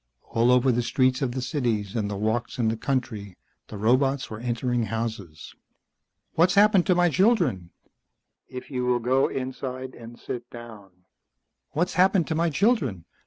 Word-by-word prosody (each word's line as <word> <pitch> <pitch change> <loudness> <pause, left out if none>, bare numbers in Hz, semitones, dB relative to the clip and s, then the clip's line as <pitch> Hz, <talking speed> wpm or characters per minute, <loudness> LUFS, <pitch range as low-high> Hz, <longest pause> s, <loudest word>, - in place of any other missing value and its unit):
All 115 +2 +2
over 125 +1 +4
the 120 0 +1
streets 130 +2 +1
of 125 -3 -1
the 130 0 -3
cities 115 - -2
and 105 -3 -1
the 100 - -4
walks 110 +3 -2
in 115 -3 +1
the 110 - -1
country 110 -7 -3 0.3
the 105 - -8
robots 130 +6 +1
were 110 - -6
entering 120 0 -1
houses. 105 -7 -5 0.8
"What's 175 +3 +3
happened 200 -2 +5
to 180 - +4
my 175 0 +4
children?" 165 - +2 0.8
"If 125 +2 -9
you 125 -2 -2
will 125 -1 +3
go 130 +3 +2
inside 130 0 -5
and 120 0 -12
sit 120 0 -7
down 115 -4 -11 0.4
" - - -55
"What's 175 +4 0
happened 185 -1 +3
to - - 0
my 165 +2 +1
children? 160 - 0
125 Hz, 165 wpm, -25 LUFS, 115-140 Hz, 0.8 s, happened